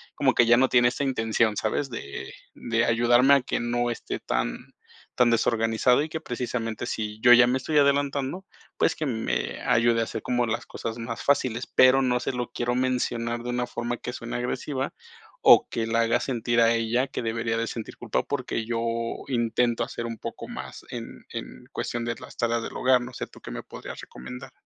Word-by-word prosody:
como - - +3
que 120 - +5
ya 120 - +7
no 130 0 +4
tiene 120 -1 +5
esa 140 - -3
intención, 115 -4 +1
¿sabes? 130 +5 -1
de 70 -11 -6 0.2
de 115 0 0
ayudarme 120 +4 +5
a 140 - +3
que - - -2
no 120 0 0
esté - - -5
tan - - -1 0.6
tan 125 -1 +4
desorganizado 115 +3 +2
y 155 - -5
que 160 +1 -5
precisamente, 120 -3 -3
si 105 -2 -4
yo 120 0 +8
ya 120 0 +8
me 130 +1 +2
estoy 150 +4 -1
adelantando, 140 +4 +1 0.3
pues, - - +2
que 155 - -3
me 85 - -2
ayude 115 -1 +4
a - - 0
hacer - - -5
como 120 -1 0
las 110 - -2
cosas 115 0 -5
más 115 0 -5
fáciles. 130 -4 +1
Pero, 130 +1 +5
no 125 -1 +2
se - - -1
lo 125 -1 -3
quiero 120 0 -1
mencionar 120 -2 -1
de 125 - -5
una 125 0 -1
forma 120 0 -3
que 125 - -6
suene 120 -3 -5
agresiva 130 +2 -3 0.5
o - - +7
que 115 -1 -2
la 115 0 +2
haga 115 0 +2
sentir 120 -2 +1
a 115 0 +5
ella 115 +4 +1
que - - -4
debería 115 0 -1
de 115 - -1
sentir 115 -2 -6
culpa, 120 -3 -1
porque 125 -5 -3
yo 115 0 -2 0.5
intento 120 -1 +1
hacer 115 - -5
un 115 -1 -5
poco - - -7
más - - -8
en - - -8
en 65 - -7
cuestión 120 -1 -3
de 120 - -2
las 130 - -12
tareas 115 -1 0
del - - -7
hogar. 125 -1 +4
No 125 +1 -8
sé, - - -5
¿tú - - -17
qué - - -8
me - - -6
podrías - - -9
recomendar? 125 - -9
120 Hz, 205 wpm, -26 LUFS, 115-125 Hz, 0.6 s, yo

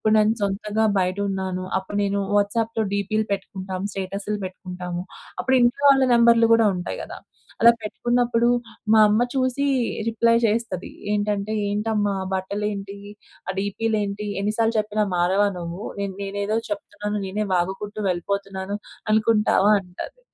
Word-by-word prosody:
ఇపుడు 215 - +3
నేను 215 +1 +4
సొంతంగా 210 +2 0
బయటున్నాను. 190 0 -1
అప్పుడు 190 +2 -4
నేను 200 0 0 0.2
వాట్సాప్‌లో 220 +2 +1
డీపీ‌లు 215 +2 0
పెట్టుకుంటాము. 190 -1 -4
స్టేటసులు 195 +2 -3
పెట్టుకుంటాము. 180 -1 -6 0.4
అప్పుడు 260 - +1
ఇంట్లో 240 +4 +2
వాళ్ళ 270 -1 +5
నంబర్లు 235 -1 +6
కూడా 230 -1 +5
ఉంటాయి 180 -1 -4
గదా! - - -8 0.4
అలా 235 +1 +8
పెట్టుకున్నప్పుడు 240 +2 +1 0.4
మా 220 - +7
అమ్మ 215 +3 +3
చూసి 260 +1 +1 0.4
రిప్లై 230 +1 +3
చేస్తది. 220 -4 -2 0.2
ఏంటంటే, 205 0 -1 0.2
"ఏంటమ్మా! 205 0 0
ఆ - - -3
బట్టలేంటి, 200 +1 -3 0.5
ఆ - - 0
డీపీలేంటి, 205 0 -1
ఎన్ని 210 +2 -1
సార్లు 225 0 +2
చెప్పినా 215 0 0
మారవా 190 +4 +3
నువ్వు. 170 +3 -6 0.2
నే 200 - -1 0.2
నేనేదో 200 +2 -2
చెప్తున్నాను, 210 -9 -4
నేనే 205 +3 -2
వాగుకుంటూ 195 +4 -2
వెళ్ళిపోతున్నాను 195 +2 -2 0.4
అనుకుంటావా" 215 -2 +3
అంటాది. 180 - -9
205 Hz, 130 wpm, -23 LUFS, 195-220 Hz, 0.5 s, అలా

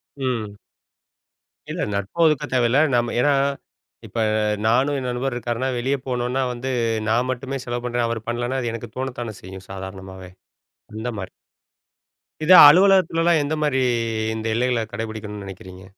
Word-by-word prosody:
ம். 115 -7 -3 1.1
இல்ல - - -4
நட்போ 100 - -3
இருக்க 150 - -1
தேவையில்ல. 125 +2 +3 0.2
நாம 120 0 0
ஏனா 145 +3 +3 0.7
இப்ப 115 - -5 0.5
நானும் 135 +5 +2
என் 125 - -4
நண்பரும் 125 +1 -2
இருக்காருன்னா 120 +2 -2
வெளிய 135 +4 0
போகணுனா 125 +1 -1
வந்து, 125 +2 -5 0.4
நான் 120 +3 +1
மட்டுமே 135 +2 -4
செலவு 120 0 -4
பண்ணறேன். 120 -1 0
அவரு 115 -2 -3
பண்ணலன்னா 120 +2 -2
அது 120 -1 -2
எனக்குத் 115 -1 -8
தோணுத்தான 120 -5 -4
செய்யும் 95 0 -10
சாதாரணமாவே. 95 -1 -8 0.7
அந்த 110 +3 -4
மாரி. 95 - -6 1.1
இத 175 - +2 0.2
அலுவலகத்துலலாம் 170 -1 +5
எந்த 155 +2 -2
மாரி 130 -3 +1 0.5
இந்த 110 0 -5
எல்லைகள 120 -1 +1
கடைபிடிக்கணும்னு 110 -2 -6
நினைக்கிறீங்க? 95 -1 -11
120 Hz, 135 wpm, -22 LUFS, 110-130 Hz, 1.1 s, அலுவலகத்துலலாம்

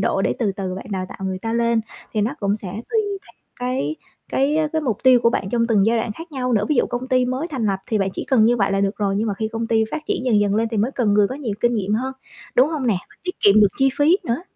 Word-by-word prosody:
độ, - - +1
để - - +1
từ 215 -5 0
từ 190 -1 -4
bạn 190 - -8
đào 185 -2 -2
tạo - - -10
người 190 -1 -2
ta 225 - -2
lên, 235 -1 +2 0.3
thì 215 - 0
nó 225 +7 0
cũng 200 0 +1
sẽ 205 -3 -4
tùy 235 - -1
theo 405 -1 -4 0.4
cái 245 - -2 0.3
cái, 280 +3 +1
á, 315 -1 +1
cái 315 -1 0
mục 230 -7 -1
tiêu 255 -2 +7
của 235 - +4
bạn 190 - -2
trong 230 0 +1
từng 215 -4 +3
giai 230 +1 +3
đoạn 225 -1 -2
khác 330 +8 -11
nhau 255 -2 -1
nữa. 210 -3 +2
Ví 300 - +2
dụ - - +3
công 245 +2 -4
ty 255 -1 +3
mới 260 +6 -2
thành 260 -9 -2
lập 195 -2 0
thì 220 - 0
bạn 195 -1 +1
chỉ - - -5
cần 240 -5 +4
như 240 +2 +4
vậy 195 -3 +1
là 195 - +1
được 200 +1 0
rồi, 200 -2 0
nhưng 220 - 0
mà 205 - -1
khi 220 +2 -3
công 225 +1 -3
ty 225 -1 +2
phát 310 - -4
triển - - -2
dần 225 -5 +3
dần 205 -1 +1
lên 225 +2 +1
thì 225 - -2
mới 215 +5 +1
cần 220 -6 +1
người 205 -1 +4
có - - -4
nhiều 260 -7 -4
kinh 240 0 +2
nghiệm 205 -1 0
hơn, 260 +4 -2 0.4
đúng 255 +4 +5
không 295 -5 -2
nè? 220 -5 +2
Và - - -20
tiết 360 - -3
kiệm 205 +1 +6
được 205 - +6
chi 270 0 +4
phí 305 +5 +5
nữa. 240 +7 -1
230 Hz, 315 wpm, -21 LUFS, 205-255 Hz, 0.4 s, tiêu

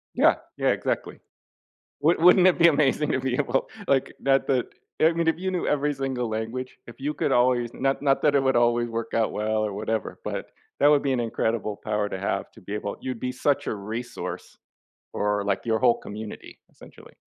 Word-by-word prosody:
Yeah. - - +5 0.2
Yeah, - - +2
exactly. - - -2 0.8
Would 160 +3 +3
wouldn't 180 +2 +7
it 185 - +4
be 170 0 +7
amazing 150 -1 +2
to 130 - 0
be 130 -1 -1
able, 135 -1 0 0.2
like, 135 -1 +2
not 135 0 +2
that 130 -3 +1 0.3
I 160 +2 +5
mean, 170 0 -1
if 160 0 +2
you 190 +1 -2
knew 180 -2 -2
every 150 0 +1
single 135 -3 -2
language 115 +4 -4
if 120 - -13
you 145 +3 -2
could - - 0
always 120 -1 +2
not 135 0 0
not 135 -1 +2
that 150 -1 +3
it 135 - +3
would 130 -2 +2
always 120 0 +2
work 115 0 -4
out 115 -1 +1
well 110 0 0
or 105 - -2
whatever, 110 +1 -3
but, - - -4 0.3
that 145 - +6
would 145 -1 +4
be 135 - +1
an 125 - 0
incredible 110 -2 -1
power 105 -1 0
to 95 - -5
have 100 - -2
to - - -17
be 100 +3 -6
able 100 -1 -4
you'd 130 -3 -5
be 125 - -2
such 145 +2 0
a - - -1
resource 115 +5 -6 0.5
for, 105 0 -1
like, 100 -1 0
your 110 -1 +1
whole 120 -2 +4
community, 105 +1 -9
essentially. - - -16
125 Hz, 210 wpm, -25 LUFS, 110-140 Hz, 0.8 s, wouldn't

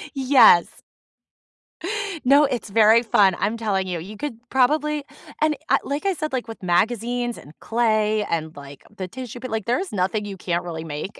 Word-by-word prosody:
Yes. 260 -10 +5 1.4
No, 280 +3 +6
it's 245 -5 -3
very 220 +2 +5
fun. 200 -5 +3
I'm 215 +3 -1
telling 200 -4 -1
you, 175 -2 -3
you 200 +6 -9
could 265 -1 -5
probably 300 +3 +1 0.4
and 310 0 +2
I - - +5
like 285 +6 -4
I 390 - +2
said, 310 -4 -5
like, 255 -2 -2
with 225 - -9
magazines, 235 +6 0
and 145 - -14
clay 215 -2 +1
and, 160 -1 -3
like, 140 -1 -12
the 185 -3 -5
tissue, 245 +3 -8
but 255 0 -7
like 220 -3 -3
there's 350 +11 -1
nothing 205 +2 -1
you 200 -2 -7
can't 175 -1 -2
really 165 -2 -6
make. 160 +6 -7
220 Hz, 175 wpm, -22 LUFS, 185-255 Hz, 1.4 s, No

